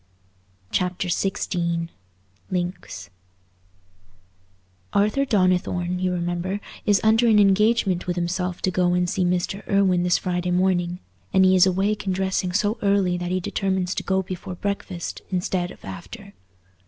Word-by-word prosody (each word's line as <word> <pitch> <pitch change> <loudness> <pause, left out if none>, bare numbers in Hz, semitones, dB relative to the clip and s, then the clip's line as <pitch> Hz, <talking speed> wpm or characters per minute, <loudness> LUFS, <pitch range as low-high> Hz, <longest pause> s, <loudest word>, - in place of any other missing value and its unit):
Chapter 180 0 -1
XVI 170 -3 -1 0.6
Links 175 - -4 1.8
Arthur 210 +7 +2
Donnithorne, 180 -4 +1
you 185 0 0
remember, 175 +2 -2 0.3
is 205 -2 +4
under 225 +2 +4
an 220 -2 +5
engagement 200 -2 +3
with 175 - -1
himself 180 +1 -2
to 185 - +1
go 180 0 +2
and 180 0 +1
see 185 +1 0
Mr. 180 +2 -1
Irwine 190 -3 +3
this 175 0 +3
Friday 180 -1 -2
morning, 180 -1 +1 0.4
and 190 -1 +5
he 185 0 +5
is 185 0 +6
awake 200 +3 0
and 185 - +1
dressing 190 -1 -1
so 205 +3 0
early 200 -3 +2
that 175 0 -3
he 185 +1 0
determines 190 0 -1
to - - -3
go 190 0 0
before 185 0 -6
breakfast, 195 -2 -4
instead 180 -1 -1
of - - -13
after. 200 - -9
185 Hz, 140 wpm, -23 LUFS, 175-195 Hz, 1.8 s, is